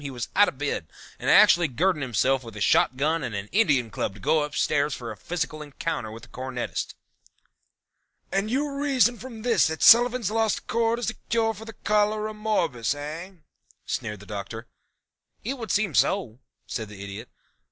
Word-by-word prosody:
he 140 - -5
was 125 -2 -5
out 205 +1 +6
of - - -4
bed 145 - -2 0.3
and - - -1
actually 175 -1 +7
girding 160 +5 0
himself 130 +1 +1
with 115 -2 -10
a - - -7
shotgun 145 +10 +2
and 110 - -4
an 100 +1 -4
Indian 140 - +2
Club 100 -1 -3
to - - -12
go 155 +10 +2
upstairs 150 0 0
for 120 -2 -6
a - - -7
physical 155 -3 -4
encounter 145 -5 -4
with 115 +1 -10
the 120 - -14
cornetist." 125 +1 -4 1.4
"And 195 +2 0
you 285 +4 0
reason 270 -4 +2
from 235 -4 -9
this 230 -6 +3
that 160 0 -3
Sullivan's 240 -2 +6
Lost 225 -1 0
Chord 230 +1 +1
is 240 -1 -1
a - - -15
cure 225 -1 +2
for 220 +2 -11 0.2
Cholera 210 +1 +1
morbus, 170 - 0
eh?" 155 +6 -7 0.5
sneered 105 -3 -4
the - - -12
Doctor. 105 +3 -6 0.8
"It 260 +4 -3
would 225 -3 -6
seem 200 -3 +1
so," 125 - +1 0.3
said 110 -2 -4
the 100 -1 -9
Idiot. 100 +4 -8
155 Hz, 175 wpm, -25 LUFS, -, 1.4 s, actually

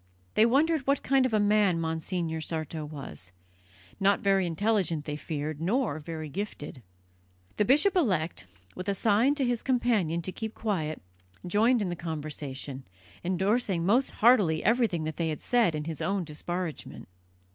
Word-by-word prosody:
They 220 - +5
wondered 290 +3 +2
what 275 0 +2
kind 265 -1 +3
of - - -7
a - - +3
man 205 -4 +3
Monsignor 160 0 -2
Sarto 160 0 -4
was; 140 -11 -8 0.7
not 200 0 +3
very 195 -2 +2
intelligent, 170 -3 0
they 150 - -3
feared, 150 0 -4
nor 205 - 0
very 155 0 -6
gifted. 150 -5 -6 0.8
The 210 - +3
bishop 300 - +5
elect, 180 - 0 0.3
with 185 +2 -5
a 200 - 0
sign 225 +7 +3
to 275 -3 0
his 245 -2 0
companion 220 - +1
to 185 - -4
keep 220 +3 -6
quiet, 160 - -2 0.4
joined 220 +5 +3
in 185 - -2
the 175 - -3
conversation, 145 -4 -5 0.4
endorsing 190 0 0
most 240 +8 +3
heartily 210 -9 +4
everything 225 -8 +2
that 155 -1 -4
they 160 -2 -1
said 230 -3 +1
in 150 - -3
his 160 -1 -5
own 195 -1 0
disparagement. 165 - -5
185 Hz, 155 wpm, -28 LUFS, 160-225 Hz, 0.8 s, They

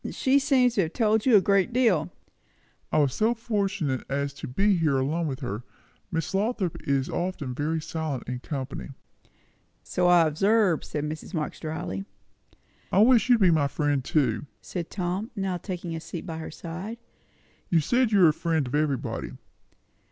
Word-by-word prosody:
"She 270 +1 +2
seems 260 -3 +3
to 205 - +2
have 165 -2 -2
told 220 0 +2
you 245 - +6
a 200 - +7
good 200 +2 +2
deal." 225 -11 +2 0.8
"I - - +2
was 145 -4 +3
so 225 +2 +2
fortunate 200 - -1
as 140 0 -1
to 140 - -7
be 195 +10 +2
here 155 -5 +2
alone 155 +5 0
with 135 -3 -4
her. 120 -4 -4 0.5
Miss 165 +1 -2
Lothrop 200 -3 0
is 135 -1 +1
often 175 -7 -3
very 155 +5 -1
silent 155 -4 -4
in 125 0 -3
company." 135 0 -5 0.9
"So 180 0 0
I 175 -2 +6
observe," 195 +3 +2
said 150 - -4
Mrs. 155 +4 -5
Marx 155 -2 -3
dryly. 155 - -4 0.9
"I - - +1
wish 250 0 +4
you'd 240 -3 +5
be 185 -3 +6
my 150 -3 +3
friend 145 -1 0
too!" 135 -2 0
said 175 -3 -6
Tom, 185 +4 -3
now 195 -3 -1
taking 175 -2 -5
a - - -4
seat 160 +1 -7
by 165 -3 -5
her 160 - -6
side. 180 +8 -7 0.7
"You 170 - +4
said 240 - +2
you 195 -4 +6
are - - +7
a - - +1
friend 160 -3 0
of 125 - -7
everybody." 145 -3 -1
165 Hz, 175 wpm, -26 LUFS, 145-200 Hz, 0.9 s, a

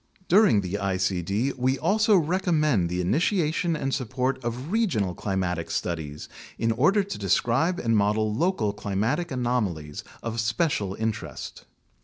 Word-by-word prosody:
Dur 205 +4 +6
ing 105 - +3
the 95 +2 -3
icd 95 +5 0
we 130 +2 +1
also 210 +5 +3
recommend 155 - +1
the 90 +1 -1
initiation 165 - +1
and 135 -3 -2
support 130 +1 -1
of 125 +7 -4
regional 155 - +1
climatic 90 -3 -2
studies 75 -4 -4 0.3
in 115 0 +1
order 170 - +3
to 200 - -6
describe 120 - +1
and 115 -1 +1
model 105 +1 +2
local 140 - 0
climatic 110 - -1
anomalies 110 - -2 0.2
of 115 0 -3
special 110 - 0
interest. 110 -1 -5
115 Hz, 135 wpm, -26 LUFS, 100-155 Hz, 0.3 s, Dur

